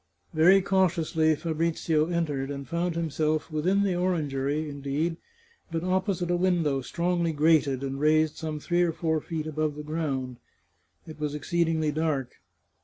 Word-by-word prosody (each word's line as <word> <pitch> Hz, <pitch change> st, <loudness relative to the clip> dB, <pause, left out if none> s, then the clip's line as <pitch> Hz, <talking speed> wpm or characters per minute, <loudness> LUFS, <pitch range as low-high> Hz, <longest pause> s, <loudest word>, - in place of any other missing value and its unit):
Very 180 Hz, +5 st, +5 dB
cautiously 165 Hz, -5 st, +2 dB
Fabrizio 160 Hz, 0 st, 0 dB
entered, 150 Hz, -6 st, -1 dB
and 140 Hz, -1 st, -6 dB
found 170 Hz, 0 st, -1 dB
himself 155 Hz, -1 st, -1 dB
within 180 Hz, +6 st, +1 dB
the 195 Hz, -2 st, +1 dB
orangery, 155 Hz, -4 st, -1 dB
indeed, 145 Hz, +3 st, -2 dB, 0.5 s
but 165 Hz, 0 st, -2 dB
opposite 185 Hz, -1 st, 0 dB
a -, -, +3 dB
window 175 Hz, -6 st, +1 dB
strongly 170 Hz, +4 st, 0 dB
grated, 145 Hz, -3 st, +3 dB
and 135 Hz, 0 st, -3 dB
raised 155 Hz, +1 st, +3 dB
some 155 Hz, -1 st, -4 dB
three 175 Hz, +4 st, 0 dB
or 170 Hz, -2 st, +2 dB
four 160 Hz, -1 st, -1 dB
feet 160 Hz, -1 st, -4 dB
above 155 Hz, -1 st, -2 dB
the 150 Hz, -, -7 dB
ground. 140 Hz, -5 st, -3 dB, 0.7 s
It 155 Hz, -1 st, -10 dB
was 150 Hz, -1 st, -2 dB
exceed 170 Hz, +3 st, 0 dB
ingly 160 Hz, -2 st, 0 dB
dark. 150 Hz, -5 st, -2 dB
160 Hz, 150 wpm, -27 LUFS, 150-170 Hz, 0.7 s, Very